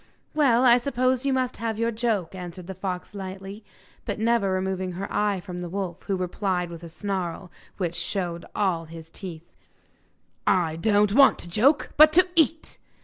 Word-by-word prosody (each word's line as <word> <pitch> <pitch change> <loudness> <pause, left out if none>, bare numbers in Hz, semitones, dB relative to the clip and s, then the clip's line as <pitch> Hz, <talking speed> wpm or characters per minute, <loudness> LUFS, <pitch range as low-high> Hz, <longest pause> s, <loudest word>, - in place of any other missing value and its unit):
'Well, 260 -5 +4
I 245 0 +7
suppose 255 +1 0
you - - +2
must 255 -1 -1
have 225 -1 -3
your 230 +1 0
joke,' 220 -7 -1
answered 180 -1 -8
the 190 - -6
fox 185 0 -5
lightly, 195 +1 -7 0.4
but - - -3
never 225 -2 +2
removing 185 -1 -2
her 190 +3 -4
eye 205 -2 +1
from 180 -1 -7
the 175 -1 -5
wolf, 190 -2 -4
who 195 - +1
replied 180 -1 -2
with 165 -1 -8
a 170 - -8
snarl 180 -1 -4 0.3
which 175 -4 -2
showed 175 -1 -3
all 185 -5 0
his 165 0 -11
teeth: 175 -4 -9 0.9
'I 165 -4 +2
don't 205 +2 +3
want 275 +2 +6
to - - -7
joke, 265 - +3
but 310 +1 +8
to 365 +3 +5
eat! 320 0 +1
195 Hz, 175 wpm, -25 LUFS, 180-230 Hz, 0.9 s, but